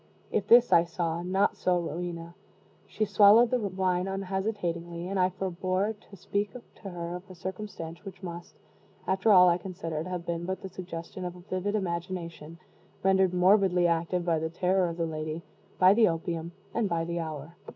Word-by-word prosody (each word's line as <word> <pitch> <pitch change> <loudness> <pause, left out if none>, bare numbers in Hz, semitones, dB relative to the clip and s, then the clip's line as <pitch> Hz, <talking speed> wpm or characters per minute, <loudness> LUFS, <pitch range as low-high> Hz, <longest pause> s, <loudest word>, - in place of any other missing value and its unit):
If - - 0
this 240 +1 +7
I 170 - +7
saw 170 -1 -2
not 190 +3 +1
so 180 -1 +1
Rowena. 170 0 -5 0.5
She 215 - -1
swallowed 210 +3 +6
the 250 - +2
wine 185 -3 0
unhesitatingly, 190 -3 -3
and 195 0 -2
I 180 0 +4
forebore 185 +2 -1
to 205 -1 -17
speak 200 +2 -2
to 235 -4 -11
her 175 -1 -5
of 185 +2 -15
a 185 - -10
circumstance 180 -2 -7
which 190 -2 -10
must, 175 -1 -8 0.5
after 190 +3 +2
all, 180 -2 +8
I 175 0 +3
considered, 170 -3 -5
have 180 -2 -4
been 170 -1 -3
but 190 +1 -4
the 190 - -5
suggestion 180 0 -7
of 180 0 -5
a 180 - -12
vivid 185 +2 -2
imagination, 170 -3 -4 0.5
rendered 190 -1 +4
morbidly 185 -1 +4
active 170 +1 0
by 165 -2 +2
the 160 +1 -2
terror 180 +2 +1
of 165 - -6
the 170 - 0
lady, 155 +1 -4 0.3
by 185 +1 +7
the 220 0 +5
opium, 165 0 -3 0.2
and 225 -4 0
by 165 -1 0
the 170 0 -3
hour. 160 0 -6
180 Hz, 180 wpm, -28 LUFS, 170-195 Hz, 0.5 s, all